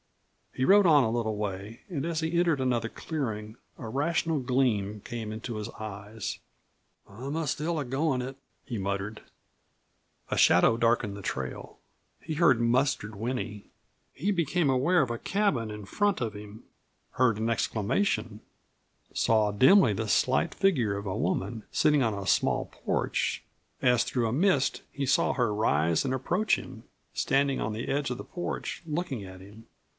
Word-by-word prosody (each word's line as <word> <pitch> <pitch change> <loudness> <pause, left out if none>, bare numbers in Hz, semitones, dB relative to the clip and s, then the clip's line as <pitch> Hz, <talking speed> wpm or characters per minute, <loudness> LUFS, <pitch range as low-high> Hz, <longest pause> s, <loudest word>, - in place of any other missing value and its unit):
He 130 - 0
rode 200 +3 +6
on 150 -4 +6
a 110 - 0
little 110 -2 -1
way, 105 +2 -5
and 155 -6 -3
as 165 -2 -1
he 160 +1 -1
entered 170 -5 +2
another 120 -3 0
clearing 110 -10 -4 0.2
a 115 - -7
rational 155 +5 0
gleam 120 -6 0
came 115 -2 -5
into 110 +2 -5
his 105 -1 -4
eyes. 105 0 -6 0.7
"I'm 130 +9 -6
still 155 +3 -1
a 145 - -2
goin' 135 +1 0
it," 130 +2 -5 0.3
he 120 - -4
muttered. 100 +2 -3 1.1
A - - -1
shadow 115 - +5
darkened 115 -3 +1
the 100 - -8
trail; 65 -7 -5 0.4
he 160 - -5
heard 150 -6 +4
Mustard 120 -2 +1
whinny. 110 -2 -4 0.4
He 195 +9 -1
became 170 -3 +1
aware 140 +7 +3
of 130 - 0
a 115 - -4
cabin 155 - 0
in 105 -1 -7
front 205 - 0
of 115 -4 -2
him; 105 +1 -10 0.5
heard 125 -4 +2
an 110 +1 -1
exclamation; 115 - 0 0.7
saw 110 -2 +2
dimly 130 - +6
the 110 +2 -3
slight 130 - +2
figure 125 - +1
of 100 - -6
a 95 -1 -2
woman, 100 +4 -2
sitting 150 -2 +3
on 110 -3 0
a 100 -1 -5
small - - +2
porch; - - -2 0.4
as 125 -3 +4
through 120 -3 -1
a 110 - -1
mist, 155 -2 +2
he 140 - -3
saw - - +3
her 120 -5 +1
rise 85 -6 +2
and 130 - -1
approach 180 +11 +1
him, 125 -4 -10 0.3
standing 135 0 +1
on - - -1
the 110 +3 -4
edge 140 0 0
of 125 - -3
the - - -7
porch, 175 0 -5
looking 150 - -3
at 95 -1 -10
him. 105 +4 -14
120 Hz, 165 wpm, -28 LUFS, 105-145 Hz, 1.1 s, rode